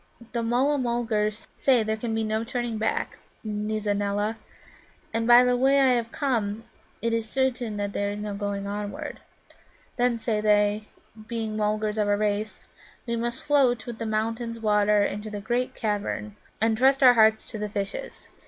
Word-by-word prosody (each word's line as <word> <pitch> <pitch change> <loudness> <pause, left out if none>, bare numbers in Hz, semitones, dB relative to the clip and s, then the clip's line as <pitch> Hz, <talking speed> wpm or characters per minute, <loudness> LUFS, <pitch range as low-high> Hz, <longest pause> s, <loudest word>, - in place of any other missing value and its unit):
"The 235 - -1
Mulla 255 +5 +2
mulgars 230 -3 -1
say 255 -4 +3
there 220 0 -1
can 225 0 -3
be 225 - 0
no 220 +1 -1
turning 240 -2 -3
back, 220 - -1 0.2
Nizza 210 -1 -2
neela. 205 +2 -1 0.7
And, 225 0 0
by 240 +1 +8
the 250 0 +3
way 270 +3 +4
I 270 -1 +5
have 235 -2 0
come, 225 -6 -1 0.4
it 230 0 +1
is 225 -1 -1
certain 250 -4 -1
that 205 0 -3
there 200 0 -1
is 205 - -4
no 210 -1 -4
going 200 0 -3
onward. 205 0 -5 0.8
Then, 245 -1 +2
say 220 -2 -1
they, 210 0 +2 0.4
being 225 -2 -3
Mulgars 215 0 0
of 210 - +2
a 205 0 +2
race, 210 0 -2 0.4
we 235 -1 -1
must 235 +2 -3
float 260 -6 +2
with 235 -2 -7
the 225 - -3
mountain 225 +2 -2
water 210 -1 +3
into 210 +2 -4
the 210 -1 -5
great 240 +4 -1
cavern, 210 -1 -3 0.2
and 225 0 +2
trust 270 +4 +3
our 250 -1 +9
hearts 220 -1 +4
to 220 - -6
the 210 0 -3
fishes. 205 - -5
220 Hz, 175 wpm, -26 LUFS, 210-240 Hz, 0.8 s, our